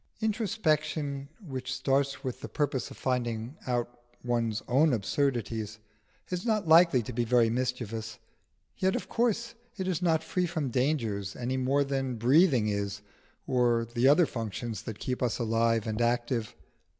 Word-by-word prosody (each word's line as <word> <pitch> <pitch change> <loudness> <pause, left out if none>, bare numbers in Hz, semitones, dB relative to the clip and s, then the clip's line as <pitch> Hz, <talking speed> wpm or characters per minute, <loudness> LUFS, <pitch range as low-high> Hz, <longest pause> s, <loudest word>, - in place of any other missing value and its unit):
Introspection 155 - -1
which 135 - -6
starts 135 +1 0
with 130 -2 -4
the - - -6
purpose 145 -5 -1
of - - -11
finding 120 0 -2
out 120 -1 -2 0.2
one's 115 -2 -1
own 140 +4 +4
absurdities 110 -2 -1 0.5
is 180 0 -2
not 215 -6 0
likely 160 -6 +6
to 125 - -6
be 120 +1 0
very 120 -1 +3
mischievous, 115 -3 -3 0.6
yet 190 0 +2
of 185 - -3
course 235 0 0 0.2
it 190 -2 -2
is 185 -3 -1
not 160 -3 +2
free 180 -1 0
from 160 -6 -2
dangers 115 -7 0
any 125 +1 -2
more 135 +2 +2
than 135 -2 -2
breathing 130 - +4
is, 100 0 -2 0.4
or 120 -2 +2
the 120 +2 +3
other 150 +5 +6
functions 115 -2 -4
that 110 -3 -7
keep 125 -1 -3
us 125 -3 0
alive 115 -1 +1
and 110 +1 -2
active. 120 -1 0
125 Hz, 150 wpm, -29 LUFS, 115-150 Hz, 0.6 s, likely